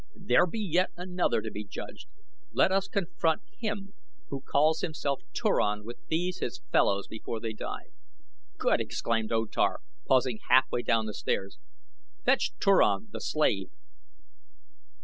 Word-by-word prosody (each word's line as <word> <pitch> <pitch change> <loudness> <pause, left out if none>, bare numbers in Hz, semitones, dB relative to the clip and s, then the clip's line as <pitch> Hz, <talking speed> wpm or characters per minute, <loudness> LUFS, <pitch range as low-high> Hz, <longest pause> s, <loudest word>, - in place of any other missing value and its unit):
"There 125 +9 +3
be 220 - -4
yet 185 -3 +2
another 180 -9 0
to 110 - -4
be 105 - -5
judged. 100 - -8 0.4
Let - - +3
us 195 0 +2
confront 170 -4 0 0.2
him 205 -2 -3 0.4
who 135 -1 -4
calls 155 +4 +2
himself 145 -4 -2
Turan 105 0 +1
with 120 +3 -8
these 175 +3 -1
his 375 - -3
fellows 100 0 +3
before 110 +1 -5
they 110 0 -4
die." 105 - -6 0.7
"Good!" - - +2
exclaimed 115 -1 -1
O 115 0 +2
Tar, - - +1 0.3
pausing 130 -4 +3
half 130 +1 +7
way 120 - 0
down 115 -2 +2
the 105 - -4
steps. 95 -1 -2 0.7
"Fetch 265 +1 +3
Turan, 200 +2 +4
the - - -6
slave!" 100 -11 +1
140 Hz, 145 wpm, -29 LUFS, 110-180 Hz, 0.7 s, half